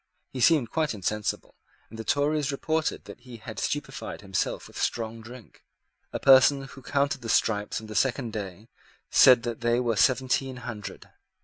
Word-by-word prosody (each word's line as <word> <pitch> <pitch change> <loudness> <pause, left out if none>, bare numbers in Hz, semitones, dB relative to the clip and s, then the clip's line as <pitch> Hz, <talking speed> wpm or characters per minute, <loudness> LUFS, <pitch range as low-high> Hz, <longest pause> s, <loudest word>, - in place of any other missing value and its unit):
He 130 - -5
seemed 140 -5 +4
quite 155 -7 0
insensible; 105 +2 -3 0.4
and 110 - -10
the - - -4
Tories 145 +3 0
reported 155 +3 -2
that - - -11
he 125 -3 -12
had 110 - -8
stupified - - -4
himself 95 -2 -2
with - - -8
strong 115 -1 -2
drink. 120 0 -13 0.5
A - - -3
person 135 +1 +6
who 135 0 -12
counted 140 +1 -1
the 115 - -6
stripes 105 -2 +1
on 110 - -11
the 110 - -8
second 125 -1 0
day 100 0 -6 0.4
said 125 -2 +7
that 120 -1 -4
they 120 +1 +2
were 120 -2 0
seventeen 130 +2 +1
hundred. 105 -4 -7
120 Hz, 170 wpm, -26 LUFS, 110-135 Hz, 0.5 s, said